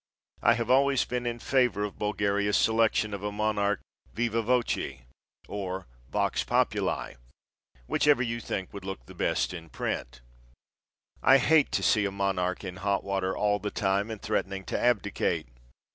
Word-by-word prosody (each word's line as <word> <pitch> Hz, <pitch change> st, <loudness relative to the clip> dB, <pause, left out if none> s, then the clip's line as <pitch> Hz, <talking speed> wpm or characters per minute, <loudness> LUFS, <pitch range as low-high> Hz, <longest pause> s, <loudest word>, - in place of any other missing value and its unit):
I -, -, +5 dB
have 115 Hz, +1 st, -1 dB
always 135 Hz, 0 st, +4 dB
been 125 Hz, 0 st, -3 dB
in 120 Hz, 0 st, -2 dB
favor 125 Hz, -4 st, +1 dB
of 105 Hz, -, -5 dB
Bulgaria's 105 Hz, -1 st, +1 dB
selection 110 Hz, -1 st, +2 dB
of 100 Hz, -, -4 dB
a 105 Hz, 0 st, -2 dB
monarch 105 Hz, -1 st, 0 dB, 0.3 s
viva 115 Hz, 0 st, 0 dB
voce 115 Hz, -, 0 dB, 0.4 s
or 95 Hz, -2 st, -4 dB, 0.2 s
vox -, -, 0 dB
populi, -, -, 0 dB, 0.7 s
whichever 145 Hz, -, +3 dB
you 115 Hz, -1 st, -2 dB
think 95 Hz, -4 st, -4 dB
would 100 Hz, -2 st, -7 dB
look 95 Hz, -11 st, -6 dB
the -, -, -12 dB
best -, -, 0 dB
in 85 Hz, -2 st, -8 dB
print. 60 Hz, -4 st, -4 dB, 1.0 s
I 135 Hz, +1 st, +7 dB
hate 150 Hz, +2 st, +4 dB
to -, -, +1 dB
see 105 Hz, -3 st, +3 dB
a 100 Hz, -, -1 dB
monarch 95 Hz, -2 st, -1 dB
in 90 Hz, -2 st, -6 dB
hot 100 Hz, +1 st, 0 dB
water 95 Hz, -1 st, -1 dB
all 105 Hz, 0 st, +2 dB
the 105 Hz, +1 st, -3 dB
time 100 Hz, 0 st, 0 dB
and 110 Hz, -2 st, -5 dB
threatening 95 Hz, -2 st, -2 dB
to -, -, -2 dB
abdicate. 120 Hz, -6 st, +1 dB
105 Hz, 160 wpm, -28 LUFS, 95-115 Hz, 1.0 s, I